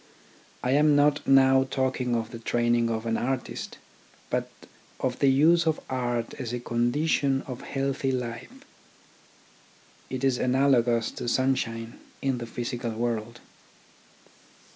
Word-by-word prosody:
I 125 - +1
am 150 +1 +4
not 145 +1 +2
now 135 -1 +5
talking 130 -2 0
of 115 -1 -3
the 115 - -7
training 120 0 +1
of 115 0 -2
an 115 -1 0
artist, 130 0 -3 0.5
but - - -1 0.5
of 125 -1 -2
the 140 - +4
use 160 +5 +4
of 160 - +1
art 120 -2 -2
as 120 -3 -4
a 125 - -2
condition 135 +3 +1
of 125 -3 -7
healthy 135 0 -2
life. 130 - -5 1.4
It 130 0 -4
is 130 -2 +2
analogous 125 -3 +2
to - - -6
sunshine 120 -3 -1 0.2
in 135 -2 -1
the 120 - -6
physical 120 0 -4
world. 115 0 -3
125 Hz, 130 wpm, -27 LUFS, 120-135 Hz, 1.4 s, now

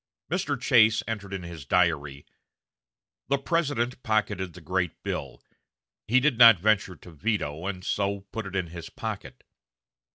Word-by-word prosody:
Mr. - - -1
Chase 110 -2 +4
entered 105 -3 -5
in 95 -2 -4
his 85 -3 -8
diary: 75 -3 0 1.0
"The 140 - +2
President 135 -5 -1
pocketed 105 -5 -1
the - - -11
great 90 +1 -2
bill.... - - -5 0.6
He 125 +4 +4
did 130 -3 +1
not 115 -4 +10
venture 100 -1 +1
to 90 - -14
veto, 85 -2 -2
and 95 -2 -4
so 100 0 -1
put 110 -3 -4
it 95 - -8
in 90 -3 -1
his 85 0 -8
pocket. - - -7
100 Hz, 150 wpm, -27 LUFS, 85-115 Hz, 1.0 s, not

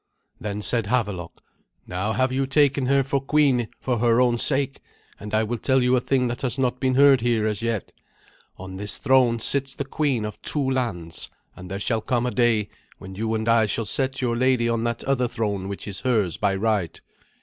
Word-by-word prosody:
Then 105 0 -4
said 115 -2 +1
Havelok, 105 -7 -2 0.4
"Now 95 +5 -2
have 130 +3 +1
you 135 +1 0
taken 140 -1 +2
her 135 0 +3
for 135 +1 -1
queen 135 -4 +2
for 125 -3 -1
her 115 0 +3
own 120 -2 +3
sake, 135 0 0 0.4
and 105 +1 -8
I 110 +1 +2
will 115 +2 -3
tell 130 +1 +2
you 125 +1 +3
a 125 - +2
thing 125 -1 +1
that 120 0 -4
has 125 -2 -1
not 125 -1 0
been 130 -1 +1
heard 140 -2 +6
here 115 -2 +1
as 105 -1 -2
yet. 115 -3 -2 0.7
On 95 0 -8
this 105 +1 -2
throne 130 -3 +3
sits 135 +4 0
the 140 - -4
queen 135 -5 -1
of 105 -1 -7
two 145 -3 -1
lands, 115 -11 -2 0.3
and 90 0 -10
there 95 +1 -4
shall 110 +2 -1
come 120 +1 0
a 125 - -1
day 115 -4 +2 0.3
when 95 0 -10
you 110 +3 -2
and 110 +1 -3
I 115 -1 +4
shall 115 +2 -2
set 135 +3 -2
your 120 -1 0
lady 125 -1 +2
on 115 0 0
that 115 -1 -2
other 130 -2 +1
throne 100 -5 -3
which 100 - -7
is 100 -1 -4
hers 110 -10 0
by 100 -2 0
right. 100 -4 -1
120 Hz, 210 wpm, -24 LUFS, 105-130 Hz, 0.7 s, heard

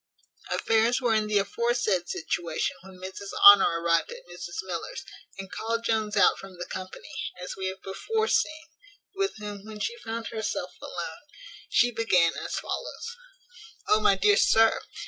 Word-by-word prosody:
Affairs 225 +2 +2
were 245 -3 +1
in 215 -1 +1
the 210 -1 +2
aforesaid 205 -3 0
situation 165 0 -2
when 190 0 -13
Mrs 190 +2 -8
Honour 195 -4 +9
arrived 170 -1 +2
at - - -10
Mrs 435 - -6
Miller's, - - -5 0.3
and 195 -1 -8
called 230 +1 -2
Jones 215 -2 0
out 200 - +5
from 195 -2 -11
the 175 - -5
company, 185 0 -8 0.3
as 180 - -6
we 190 -1 -3
have 190 0 -6
before 440 - -2
seen, 315 -3 0 0.5
with 390 0 -1
whom, 205 -2 -7
when 215 0 -9
she 465 - -2
found 225 - -5
herself 205 -5 -3
alone, 160 -2 -6 0.5
she 245 - +3
began 190 -8 +3
as - - -4
follows: 470 - -5 0.7
"O, 215 - +5
my 200 -2 +4
dear 205 +2 +4
sir! 225 0 +4
210 Hz, 160 wpm, -27 LUFS, 190-230 Hz, 0.7 s, Honour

